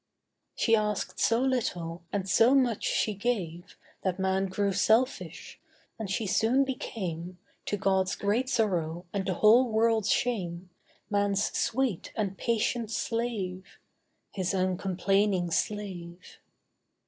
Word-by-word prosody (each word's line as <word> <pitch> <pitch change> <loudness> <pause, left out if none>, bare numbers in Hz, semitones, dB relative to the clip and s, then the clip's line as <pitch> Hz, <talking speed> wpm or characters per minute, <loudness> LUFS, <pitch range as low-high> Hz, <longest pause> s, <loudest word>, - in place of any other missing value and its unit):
She 225 - +3
asked 210 -2 -2
so 230 +1 +3
little, 180 -11 -1
and 195 -2 -2
so 230 +7 +5
much 250 -5 +2
she 215 - +1
gave, 190 -6 -3 0.2
That 185 -2 -1
man 190 0 +1
grew 200 +1 0
selfish: 225 +7 0 0.4
and 215 -3 -4
she 205 +3 -1
soon 225 +7 +3
became, 185 -9 -5 0.3
To 205 - -1
God's 190 -1 +1
great 225 +6 0
sorrow 175 -8 0
and 195 -1 -2
the 185 - 0
whole 235 +6 +5
world's 220 -1 +2
shame, 180 -7 -1 0.4
Man's 205 0 +1
sweet 245 -7 -1
and 200 -3 -2
patient 230 +1 -1
slave— 215 -6 -3 0.5
His 190 -1 -2
uncomplaining 185 0 +1
slave. 180 -2 -4
200 Hz, 120 wpm, -28 LUFS, 185-225 Hz, 0.5 s, so